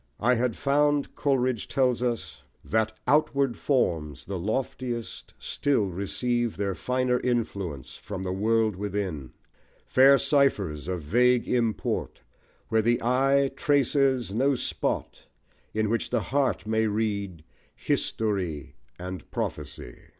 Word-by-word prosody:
"I 120 +4 +3
had 120 -1 0
found," 145 +1 +2
Coleridge 130 -5 0
tells 125 -3 +1
us, 120 -3 -3 0.2
That 110 0 0
outward 140 -4 +2
forms, 80 - -1
the 95 -2 -4
loftiest, 120 +3 -4
still 140 -8 0
receive 120 +6 -1
Their 100 -1 -1
finer 125 +6 0
influence 100 - -3
from 95 -2 -6
the 90 - -2
world 110 +1 +1
within; 95 -9 -4 0.5
Fair 135 +2 +6
ciphers 100 - +1
of 90 -3 -3
vague 125 +8 +3
import, 115 -4 -1 0.5
where 110 0 +3
the 120 +2 +2
eye 135 +3 +3
Traces 135 - +2
no 135 +5 +2
spot, - - -3 0.4
in 110 0 0
which 115 +1 -1
the - - +1
heart 135 -7 0
may 110 0 +1
read 100 -6 -2 0.3
History 95 -10 -2 0.2
and 90 +1 -7
prophecy - - -5
115 Hz, 120 wpm, -27 LUFS, 100-130 Hz, 0.5 s, Fair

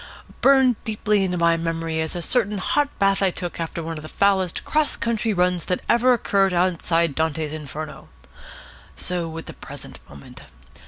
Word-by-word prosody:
Burned 265 -4 +4
deeply 210 -2 0
into 180 -1 -1
my 170 -1 +3
memory 165 -1 -2
is 160 +1 -2
a 175 - -3
certain 210 -2 +1
hot 285 +9 +1
bath 195 0 +2
I 195 - +4
took 175 -1 -5
after 165 0 -4
one 165 -1 -5
of - - -10
the 155 - -9
foulest 190 -3 +1
cross 305 -1 +1
country 230 -1 -1
runs 180 -3 +1
that 180 - -1
ever 240 +2 +4
occurred 195 -5 +2
outside 170 -3 +1
Dante's 160 0 -1
Inferno. 155 0 -7 0.9
So 175 -2 -2
with 165 0 -7
the - - -8
present - - -9
moment. 70 0 -13
180 Hz, 170 wpm, -23 LUFS, 165-205 Hz, 0.9 s, Burned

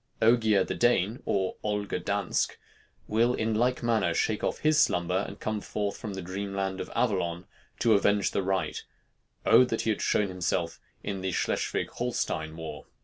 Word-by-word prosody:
Ogier 110 -3 +4
the - - -3
Dane, 120 -2 +2
or 95 -2 0
Olger 105 -1 -1
Dansk, 100 -2 0 0.5
will 115 +3 +2
in 110 0 0
like 125 +3 +1
manner 110 -8 +2
shake 110 -1 0
off - - 0
his 155 0 +4
slumber 90 - +1
and 100 - -9
come 110 -1 -2
forth 100 -1 -3
from 105 -3 -6
the 95 - -5
dream 100 +2 -4
land 95 -1 -2
of - - -6
Avallon 90 -6 0 0.3
to 115 -2 +4
avenge 100 0 +3
the - - 0
right 95 -4 -1 0.6
O - - +7
that 115 -3 -1
he 110 - +1
had 105 - -2
shown 100 -2 +2
himself 90 -2 -2 0.2
in 100 -2 -3
the 95 0 -1
Schleswig - - -1
Holstein 80 0 -2
war! 80 -1 -7
100 Hz, 175 wpm, -28 LUFS, 95-110 Hz, 0.6 s, O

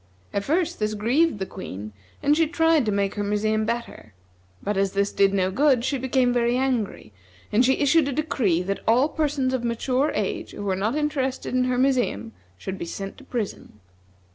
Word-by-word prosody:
At 200 - -1
first 340 - 0
this 215 0 -1
grieved 255 +8 +2
the 190 - -3
Queen, 105 - -8 0.3
and 295 - +4
she 325 0 +3
tried 325 -5 +2
to - - +2
make 200 -1 0
her 205 - -3
museum 215 +1 0
better; 230 - -5 0.5
but 205 +1 -1
as 195 0 +1
this 200 0 +1
did 195 -1 +3
no 190 -1 +1
good, 260 +1 +3
she 275 0 -1
became 255 -1 +2
very 240 0 +2
angry, 240 - -2 0.4
and 225 +4 +4
she 265 +1 +4
issued 290 +1 +3
a - - -1
decree 245 - 0
that 195 +2 -2
all 245 +6 +4
persons 290 -4 0
of 255 -2 -1
mature 250 +4 0
age 360 -6 -2
who 205 - -6
were 195 -2 0
not 210 +7 -1
interested 285 -5 -1
in 255 0 +2
her 250 0 0
museum 245 - +1 0.3
should 190 - -6
be - - -4
sent 195 +3 -6
to - - -14
prison. 220 - -5
240 Hz, 195 wpm, -24 LUFS, 200-275 Hz, 0.5 s, and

